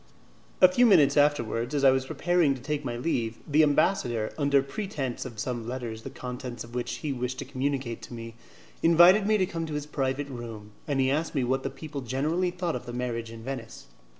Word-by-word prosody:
A 185 - +10
few 240 +7 +4
minutes 150 -9 +5
afterwards, 145 -3 +1
as 140 - 0
I 135 - +8
was 130 0 0
preparing 175 -5 +2
to 130 - -10
take 150 +1 -2
my 120 -3 -3
leave, 120 -5 -1
the 150 +1 +4
ambassador, 145 - +2
under 140 -2 +3
pretense 140 - -4
of 120 -4 -8
some 120 0 -3
letters 120 -3 -5
the 135 - -7
contents 125 -2 -6
of 115 0 -13
which 120 0 -2
he 145 - 0
wished 125 0 -3
to - - -5
communicate 130 -2 -2
to 120 - -9
me, 115 0 -8 0.5
invited 175 +5 +6
me 215 0 +4
to 190 - +2
come 170 -2 -5
into 160 -2 -4
his 150 -1 -3
private 140 -1 -2
room, 115 -5 -8 0.2
and 140 -2 0
he 130 0 +3
asked 155 +3 -1
me 135 - +2
what 130 +2 -1
people 150 -3 -6
generally 150 +9 0
thought 175 -2 -2
of 125 0 -6
the 120 - -6
marriage 120 -2 -3
in 115 0 -10
Venice. 120 -3 -7
135 Hz, 210 wpm, -27 LUFS, 120-150 Hz, 0.5 s, A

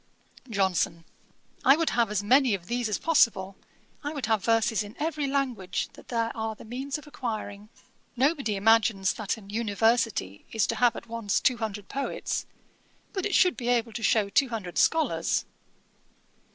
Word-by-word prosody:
JOHNSON. 190 -5 0 0.6
'I 270 - +7
would 330 -1 +1
have 235 -3 +2
as 210 -1 -1
many 255 0 +4
of 175 -3 -9
these 240 +2 -1
as 210 - 0
possible; 200 - +2 0.5
I 290 +2 -3
would 285 -4 -3
have 220 -3 +1
verses 225 -1 +2
in 205 0 -8
every 305 -2 -1
language 255 -9 -1
that - - -15
there 230 -1 -1
are 220 -1 -3
the - - -13
means 260 +5 -4
of 300 - -12
acquiring. 215 -7 -5 0.5
Nobody 270 -4 +1
imagines 210 -2 +3
that 215 0 -3
an 200 -2 -12
University 225 - 0
is 220 -1 +2
to - - -2
have 245 -2 +3
at - - -8
once 230 -3 -1
two 250 - +2
hundred 210 -3 -5
poets; 275 0 -3 0.7
but 385 0 -1
it 415 - -1
should 365 -2 +5
be 240 - -5
able 235 -2 +1
to 230 - -5
show 215 -1 +3
two 270 +5 +3
hundred 205 -7 -4
scholars. 320 -1 +2
225 Hz, 170 wpm, -27 LUFS, 205-260 Hz, 0.7 s, I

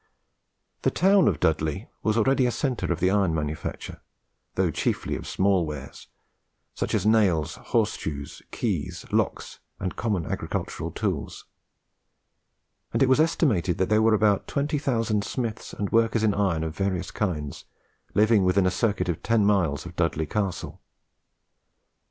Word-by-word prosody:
The - - +3
town 195 +1 +4
of 75 - +1
Dudley 80 +6 0
was 110 0 +1
already 130 +2 +3
a - - +1
centre 125 -4 -1
of 85 - -1
the 95 +1 +2
iron 95 -5 +2
manufacture, 75 0 -4 0.5
though - - +1
chiefly - - -1
of - - -7
small 95 -2 +2
wares, 75 -4 -7 0.7
such - - -2
as 100 -2 0
nails, 100 -8 +3
horse - - +1
shoes, 70 -3 -6
keys, - - -3
locks, - - -1 0.2
and 95 -1 -3
common 105 -7 -1
agricultural - - -3
tools; - - -3 1.5
and 115 +4 +2
it 130 - +3
was 130 - +4
estimated 120 - +2
that 95 - 0
there 110 0 +4
were 110 0 +4
about 105 -2 +2
20,000 135 -7 0
smiths 115 -3 -4
and 100 -2 -4
workers 115 0 +2
in 105 -2 +3
iron 95 -5 +1
of 80 0 -4
various 95 -2 -2
kinds 75 -9 -3 0.5
living 105 -1 +4
within 90 +1 +3
a 95 - +3
circuit 105 +1 0
of 85 -3 -2
ten 115 -3 +2
miles 90 -9 +1
of 90 0 -9
Dudley 80 -2 0
Castle. 100 +2 -3
100 Hz, 150 wpm, -26 LUFS, 85-115 Hz, 1.5 s, town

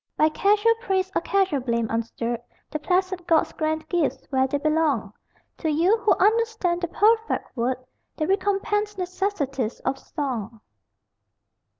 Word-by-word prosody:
By 310 - +5
casual 415 +7 +3
praise 380 -4 0
or - - +1
casual 385 -5 +1
blame 235 -2 0
unstirred 230 +1 -2 0.3
The 305 - -2
placid 365 +2 0
gods 325 -2 +3
grant 315 0 -2
gifts 295 -7 -1
where 265 -1 +3
they 285 - -1
belong: 295 -8 +1 0.5
To 320 - -1
you, 335 +8 +3
who 430 - +4
understand, 440 -5 +2
the 345 - 0
perfect 445 +5 +1
word, 250 +1 0 0.4
The 310 - 0
recompensed 410 +2 0
necessities 350 - -2
of 270 - -2
song. 235 -7 -4
325 Hz, 135 wpm, -24 LUFS, 270-395 Hz, 0.5 s, By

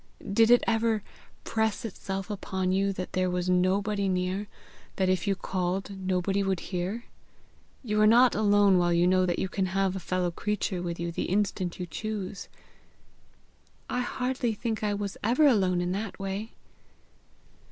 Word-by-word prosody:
Did 225 +2 +5
it 245 0 +6
ever 225 -2 +1 0.4
press 220 0 -1
itself 195 -2 -5
upon 190 -2 -2
you 195 +1 +2
that 185 -1 -6
there 185 0 +1
was 180 0 0
nobody 195 +2 +1
near 185 +2 -1 0.5
that 190 -1 +1
if 185 +1 0
you 195 - +2
called 190 +1 -2
nobody 190 +1 0
would 195 -2 0
hear? 190 +6 -4 0.8
You 215 -3 0
are 215 - +6
not 240 +2 +6
alone 205 -3 +4
while 175 0 +2
you 170 +1 +3
know 185 0 +3
that 175 - 0
you - - -1
can 190 0 -1
have 190 0 0
a - - -3
fellow 180 0 -1
creature 195 -1 -2
with 170 -1 -4
you 170 0 -2
the - - -3
instant 190 -2 -1
you 180 - -3
choose." 205 +1 -5 1.4
"I 250 - 0
hardly 250 -2 -1
think 220 0 -3
I 205 -1 +1
was 200 -1 -4
ever 245 +8 +4
alone 190 -9 +3
in 175 0 -1
that 200 +2 -4
way." 195 +3 -4
195 Hz, 165 wpm, -28 LUFS, 185-210 Hz, 1.4 s, it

